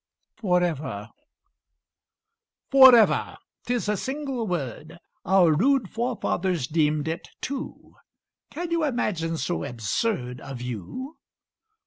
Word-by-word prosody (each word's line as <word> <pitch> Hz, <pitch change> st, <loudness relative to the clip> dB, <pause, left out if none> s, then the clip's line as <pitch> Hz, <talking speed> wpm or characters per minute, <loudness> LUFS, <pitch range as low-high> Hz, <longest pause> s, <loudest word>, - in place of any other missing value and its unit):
"FOREVER" 165 Hz, -, -1 dB, 1.6 s
Forever! 260 Hz, -5 st, +6 dB, 0.3 s
'Tis 245 Hz, -3 st, -1 dB
a 210 Hz, -, +1 dB
single 265 Hz, 0 st, -3 dB
word! 155 Hz, -, -4 dB, 0.3 s
Our 185 Hz, -3 st, +5 dB
rude 240 Hz, -, +2 dB
forefathers 190 Hz, -, -1 dB
deemed 150 Hz, +1 st, +1 dB
it 165 Hz, +1 st, -4 dB
two; 275 Hz, 0 st, -6 dB, 0.6 s
Can 340 Hz, +2 st, -5 dB
you 335 Hz, -1 st, +1 dB
imagine 185 Hz, -, -1 dB
so 175 Hz, +2 st, -2 dB
absurd 125 Hz, -, -2 dB
A 135 Hz, -1 st, -7 dB
view? 125 Hz, -, -6 dB
180 Hz, 95 wpm, -25 LUFS, 150-250 Hz, 1.6 s, Forever